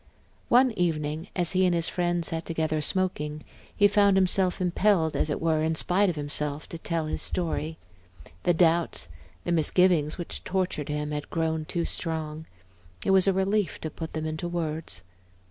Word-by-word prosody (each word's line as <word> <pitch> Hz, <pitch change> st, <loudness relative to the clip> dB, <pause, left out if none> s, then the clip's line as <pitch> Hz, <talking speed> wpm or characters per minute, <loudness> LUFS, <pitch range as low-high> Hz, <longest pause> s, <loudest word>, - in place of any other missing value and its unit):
One 255 Hz, +1 st, +5 dB
evening, 160 Hz, -4 st, -2 dB
as 175 Hz, -3 st, +3 dB
he 185 Hz, 0 st, +2 dB
and 175 Hz, -, +2 dB
his 170 Hz, -1 st, +5 dB
friend 175 Hz, -1 st, 0 dB
sat 165 Hz, 0 st, -2 dB
together 160 Hz, -2 st, -1 dB
smoking, 150 Hz, -4 st, -1 dB, 0.3 s
he 205 Hz, -, +5 dB
found 200 Hz, -1 st, +4 dB
himself 185 Hz, 0 st, +3 dB
impelled, 180 Hz, -2 st, +2 dB
as -, -, +1 dB
it 145 Hz, -, -1 dB
were, 160 Hz, -1 st, +1 dB
in 160 Hz, +1 st, 0 dB
spite 190 Hz, +5 st, +3 dB
of 175 Hz, -, -2 dB
himself, 145 Hz, 0 st, -1 dB
to 170 Hz, -, -7 dB
tell 165 Hz, -1 st, -2 dB
his 155 Hz, -, -3 dB
story. 160 Hz, -2 st, -2 dB, 0.6 s
The 175 Hz, -, +2 dB
doubts, 170 Hz, 0 st, +2 dB, 0.3 s
the 175 Hz, -, -2 dB
misgivings 165 Hz, -1 st, +2 dB
which 175 Hz, -, -5 dB
tortured 180 Hz, -6 st, -2 dB
him 150 Hz, 0 st, -2 dB
had 150 Hz, 0 st, -4 dB
grown 160 Hz, -1 st, -1 dB
too 170 Hz, +1 st, -2 dB
strong; 160 Hz, -2 st, -4 dB, 0.6 s
it -, -, +2 dB
was 190 Hz, 0 st, +5 dB
a -, -, +6 dB
relief 190 Hz, -1 st, 0 dB
to 155 Hz, -, -4 dB
put 160 Hz, -1 st, -7 dB
them 155 Hz, 0 st, -3 dB
into 155 Hz, +3 st, -3 dB
words. 160 Hz, -, -3 dB
165 Hz, 175 wpm, -27 LUFS, 155-180 Hz, 0.6 s, a